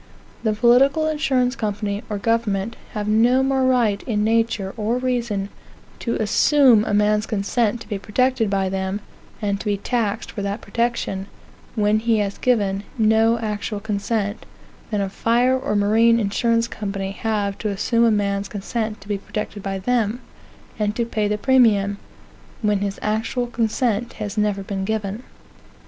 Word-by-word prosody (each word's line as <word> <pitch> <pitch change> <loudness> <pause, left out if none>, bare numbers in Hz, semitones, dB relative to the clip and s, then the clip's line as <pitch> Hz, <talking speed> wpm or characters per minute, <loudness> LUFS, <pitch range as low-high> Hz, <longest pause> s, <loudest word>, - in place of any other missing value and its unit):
The 220 -2 +1
political 260 +7 +4
insurance 265 -5 +1
company, 205 -1 -2
or 210 - -2
government, 225 -1 0 0.2
have 210 -1 -3
no 235 +5 +4
more 265 0 +1
right, 235 -6 +2
in 210 -3 0
nature 225 -3 +1
or 225 +2 -1
reason, 235 -6 -1 0.5
to 235 - -2
assume 240 +1 +4
a - - -2
man's 210 +1 +2
consent 220 +2 0
to - - -10
be 205 -3 -3
protected 240 +2 +1
by 195 -1 +1
them, 190 +1 -2 0.4
and 200 -1 0
to - - -8
be 205 -1 +1
taxed 225 0 -2
for 205 - -5
that 200 +2 -2
protection, 230 -3 -2 0.5
when 210 -1 +2
he 225 0 +2
has 200 -1 -2
given 200 -6 +1 0.2
no 225 +1 +4
actual 210 -1 -3
consent, 205 0 -2 0.4
than 210 -3 -1
a 195 - 0
fire 240 +6 +2
or 255 -5 -2
marine 225 +3 +4
insurance 230 +2 +1
company 195 -3 -4
have 205 -1 -2
to 215 - -2
assume 230 +4 +1
a 230 - +5
man's 200 -2 0
consent 215 +2 -4
to 195 - -14
be 205 -1 -2
protected 210 0 -5
by 195 0 -3
them, 230 +2 0 0.6
and 210 0 0
to 235 - 0
pay 215 -2 -1
the 210 0 0
premium, 210 -5 +3 0.6
when 210 -1 +2
his 200 0 -3
actual 220 +3 -1
consent 235 -1 -1
has 210 -1 -5
never 210 -2 0
been 195 0 -4
given. 210 +1 -2
215 Hz, 160 wpm, -22 LUFS, 200-235 Hz, 0.6 s, a